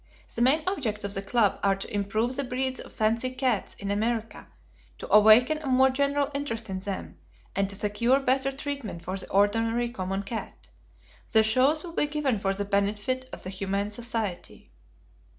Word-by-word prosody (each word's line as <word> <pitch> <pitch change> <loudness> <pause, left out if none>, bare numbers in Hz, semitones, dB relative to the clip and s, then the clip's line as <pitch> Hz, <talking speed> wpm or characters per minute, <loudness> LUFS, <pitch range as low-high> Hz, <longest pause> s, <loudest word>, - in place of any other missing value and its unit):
The 235 - -3
main 280 +6 +4
objects 240 - -2
of 200 0 -2
the 195 - -2
club 205 0 +1
are 195 -1 +3
to 195 - -8
improve 215 +5 0
the 280 - -1
breeds 260 +1 -2
of - - -9
fancy 230 +3 0
cats 255 -5 -1
in 200 0 -4
America, 225 +2 -2 0.5
to - - -6
awaken 220 +8 +6
a 305 - -7
more 265 0 +4
general 280 +1 +1
interest 230 -7 -3
in 190 - -3
them, 195 0 -6 0.4
and 195 0 +1
to 200 - -1
secure 225 +6 +2
better 270 0 +1
treatment 275 - -5
for 185 - -4
the 195 - -5
ordinary 225 +4 +2
common 195 -2 -3
cat. 220 +3 -7 0.6
The 220 -1 +6
shows 255 +8 +3
will 340 -2 -8
be 295 - +1
given 290 -7 0
for 195 -1 0
the 200 +1 -2
benefit 205 +6 -1
of - - -7
the 185 - -5
Humane 195 +2 -2
Society. 225 -4 -4
225 Hz, 180 wpm, -27 LUFS, 200-260 Hz, 0.6 s, awaken